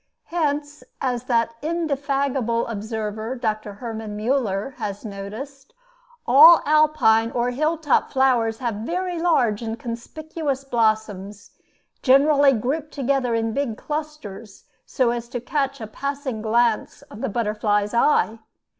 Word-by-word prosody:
Hence, 295 Hz, -3 st, -1 dB, 0.2 s
as 250 Hz, -2 st, -2 dB
that 230 Hz, -2 st, +1 dB
indefatigable 280 Hz, -6 st, -1 dB
observer, 220 Hz, +1 st, -4 dB
Dr. 215 Hz, -4 st, -3 dB
Hermann 220 Hz, -1 st, -6 dB
Müller, 225 Hz, -1 st, -1 dB
has 205 Hz, +2 st, -5 dB
noticed, 225 Hz, -, -8 dB, 0.5 s
all 310 Hz, +7 st, +8 dB
Alpine 295 Hz, -7 st, +4 dB
or 240 Hz, +1 st, -1 dB
hill 310 Hz, +6 st, 0 dB
top 305 Hz, -3 st, +1 dB
flowers 245 Hz, -4 st, +2 dB
have 235 Hz, -3 st, -3 dB
very 350 Hz, -, -3 dB
large 250 Hz, -11 st, +2 dB
and 225 Hz, 0 st, -4 dB
conspicuous 275 Hz, +5 st, -5 dB
blossoms, 215 Hz, -5 st, -1 dB, 0.5 s
generally 280 Hz, +1 st, +5 dB
grouped 275 Hz, +7 st, -2 dB
together 270 Hz, -3 st, 0 dB
in 225 Hz, 0 st, -1 dB
big 270 Hz, -5 st, -2 dB
clusters 295 Hz, -10 st, -6 dB, 0.2 s
so 255 Hz, -4 st, +1 dB
as 235 Hz, 0 st, -4 dB
to 245 Hz, -, -4 dB
catch 275 Hz, +2 st, -2 dB
a 220 Hz, -, -5 dB
passing 275 Hz, 0 st, -4 dB
glance 225 Hz, 0 st, +1 dB
of 210 Hz, -, -12 dB
the -, -, -1 dB
butterfly's 210 Hz, -1 st, 0 dB
eye. 235 Hz, -2 st, +2 dB
245 Hz, 125 wpm, -23 LUFS, 220-280 Hz, 0.5 s, all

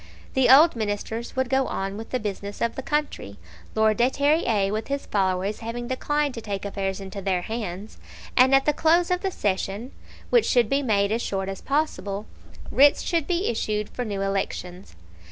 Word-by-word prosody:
The 265 Hz, -2 st, +3 dB
old 295 Hz, +5 st, +7 dB
Ministers 220 Hz, +1 st, -3 dB
would 260 Hz, 0 st, 0 dB
go 265 Hz, +1 st, +1 dB
on 195 Hz, +1 st, -3 dB
with 225 Hz, +2 st, -8 dB
the 255 Hz, -, -1 dB
business 205 Hz, -1 st, -5 dB
of 235 Hz, 0 st, 0 dB
the -, -, -5 dB
country, 290 Hz, -, -3 dB, 0.4 s
Lord 220 Hz, -1 st, +3 dB
de 240 Hz, +2 st, +4 dB
Terrier 265 Hz, -9 st, +1 dB
with 215 Hz, +1 st, -3 dB
his 280 Hz, 0 st, -3 dB
followers 190 Hz, +1 st, 0 dB
having 240 Hz, +1 st, -5 dB
declined 290 Hz, +2 st, -1 dB
to 230 Hz, -, -6 dB
take 200 Hz, -2 st, -4 dB
affairs 195 Hz, -1 st, -3 dB
into 195 Hz, +1 st, -7 dB
their 185 Hz, -2 st, 0 dB
hands; 215 Hz, -2 st, -6 dB, 0.4 s
and 260 Hz, +1 st, +6 dB
at 270 Hz, -, +3 dB
the 300 Hz, -, +3 dB
close 340 Hz, +3 st, +3 dB
of 360 Hz, 0 st, +1 dB
the 390 Hz, -, 0 dB
session, 205 Hz, -, -2 dB, 0.4 s
which 475 Hz, -3 st, +4 dB
should 240 Hz, -4 st, +3 dB
be 275 Hz, +1 st, +2 dB
made 205 Hz, -5 st, +1 dB
as 230 Hz, +2 st, 0 dB
short 195 Hz, -3 st, -2 dB
as 195 Hz, -, -6 dB
possible, 220 Hz, -9 st, -2 dB, 0.5 s
writs 285 Hz, +1 st, +5 dB
should 335 Hz, -4 st, 0 dB
be 360 Hz, +2 st, 0 dB
issued 210 Hz, -2 st, -1 dB
for 250 Hz, -, -4 dB
new 200 Hz, -4 st, -3 dB
elections. 190 Hz, -, -4 dB
225 Hz, 190 wpm, -25 LUFS, 200-270 Hz, 0.5 s, old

